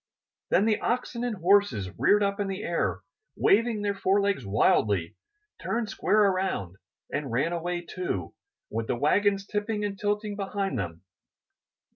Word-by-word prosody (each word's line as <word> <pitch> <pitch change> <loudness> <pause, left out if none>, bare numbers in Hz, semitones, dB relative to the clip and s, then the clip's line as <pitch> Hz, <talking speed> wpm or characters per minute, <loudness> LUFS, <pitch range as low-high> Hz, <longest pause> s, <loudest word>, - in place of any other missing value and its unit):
Then 205 - +3
the 220 -1 +2
oxen 240 0 -1
and 240 -3 -1
horses 175 - +2
reared 205 0 +4
up 200 +1 0
in 200 - 0
the 195 +2 -4
air, 170 -5 -1 0.3
waving 220 0 +2
their 205 -1 +1
forelegs 200 +1 +1
wildly, 100 -3 +2 0.5
turned 225 -2 -2
square 215 0 +3
around, 185 - 0 0.4
and 145 -4 -2
ran 135 +9 +1
away, 175 +1 -2
too, 170 - -4 0.4
with 115 +1 -2
the - - 0
wagons 195 - +2
tipping 210 0 -2
and 200 -1 -4
tilting 210 0 -1
behind 195 - -2
them. 85 -2 -5
195 Hz, 145 wpm, -27 LUFS, 145-205 Hz, 0.5 s, reared